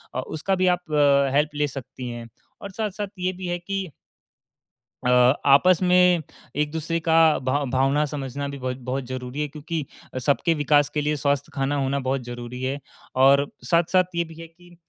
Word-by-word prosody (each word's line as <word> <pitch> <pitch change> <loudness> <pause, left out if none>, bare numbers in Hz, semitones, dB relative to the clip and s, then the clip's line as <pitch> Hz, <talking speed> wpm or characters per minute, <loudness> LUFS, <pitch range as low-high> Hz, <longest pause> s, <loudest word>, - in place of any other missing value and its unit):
अ, - - -1
उसका 175 +5 -1
भी 185 0 +1
आप 175 -3 -17
अ, 140 -2 +3
हेल्प 150 +1 +3
ले 145 0 +1
सकती 130 -2 -7
हैं। 120 -1 -7 0.3
और 200 - -7
साथ-साथ 210 0 -3
ये 180 +1 0
भी 180 0 -7
है 175 - -1
कि 195 -1 -4 1.1
अ, 125 - +3 0.4
आपस 160 +6 +5
में 180 -2 +4 0.3
एक 150 +1 0
दूसरे 165 +1 -2
का 160 0 +1 0.2
भाव 135 +2 0
भावना 135 +3 +2
समझना 140 -1 -5
भी 140 - -6
बहुत 130 -1 -4
बहुत 135 +1 -1
ज़रूरी 130 +2 -5
है 150 - -1
क्योंकि 155 +1 -5 0.4
सबके 150 +4 +2
विकास 145 -1 +3
के 150 0 -2
लिए 150 +1 0
स्वस्थ 140 -1 0
खाना 135 +1 -1
होना 135 +1 0
बहुत 135 0 0
ज़रूरी 120 +1 -7
है। 135 +2 -2 0.4
और 140 +2 +5
साथ-साथ 175 +2 +3
ये 170 - +1
भी 165 -1 -12
है 165 - -9
कि 175 +1 -20
145 Hz, 185 wpm, -24 LUFS, 135-170 Hz, 1.1 s, आपस